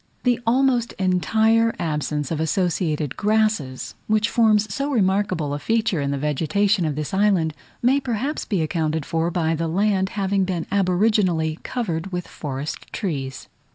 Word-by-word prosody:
The 245 -1 +2
almost 245 -1 +2
entire 220 +5 +2
absence 150 -2 -2
of 160 - -1
associated 160 -3 0
grasses, 210 -11 0
which 215 0 +2
forms 215 -3 +3
so 280 +1 -2
remarkable 190 - +1
a 145 - -3
feature 220 -4 0
in 140 - -1
the 140 - -1
vegetation 170 +7 +1
of 150 -2 -1
this 150 +3 -4
island, 190 -5 +2 0.3
may 260 +3 +4
perhaps 270 +3 -2
be 190 -7 -1
accounted 155 -1 -1
for 165 0 0
by 165 -2 0
the 165 +1 -1
land 190 +2 +1
having 195 0 +1
been 180 -3 -2
aboriginally 185 -4 +2
covered 190 -7 -3
with 180 -1 -4
forest 145 0 -6
trees. 135 -8 -4
185 Hz, 150 wpm, -22 LUFS, 160-215 Hz, 0.3 s, may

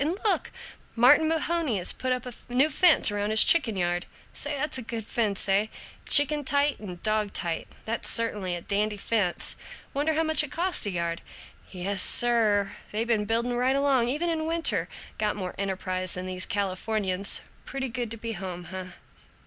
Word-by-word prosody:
And 330 +6 -2
look! 425 - 0 0.4
Martin 260 +7 +5
Mahoney 325 -6 -1
has 180 - +1
put 255 0 -3
up 250 -1 -2
a 250 - -7 0.2
new 265 +5 +2
fence 335 - +6
around 205 0 -2
his 220 0 +7
chicken 255 - +3
yard. 175 0 -1 0.3
Say, 290 0 -2
that's 285 -1 0
a - - -5
good 225 -2 -6
fence, 215 -4 0
eh? 200 +2 +2 0.4
Chicken 295 0 +5
tight 285 +1 +1
and 180 -5 -9
dog 215 -1 0
tight. 170 -2 -3 0.2
That's 225 +1 -1
certainly 205 -6 0
a 175 - -6
dandy 210 +3 -1
fence. 200 -4 -1 0.4
Wonder 295 +3 0
how 320 - +1
much 315 -1 +3
it 295 - -7
cost 350 - +1
a - - 0
yard? 170 -2 -3 0.5
Yes, 190 +1 -1
sir, 215 -5 +3 0.2
they 215 +2 -1
been 220 -3 0
building 235 +3 0
right 255 +2 +1
along, 275 -4 +2
even 310 +7 -1
in 315 -1 -2
winter. 330 0 +2 0.3
Got 210 -1 0
more 185 -3 -5
enterprise 185 -2 -3
than 180 0 -5
these 185 0 -4
Californians. 200 0 0 0.2
Pretty 265 -1 -4
good 240 -1 -4
to 230 - -6
be 230 +1 -5
home, 180 -3 -7
eh?" 185 -1 -6
225 Hz, 180 wpm, -26 LUFS, 195-275 Hz, 0.5 s, his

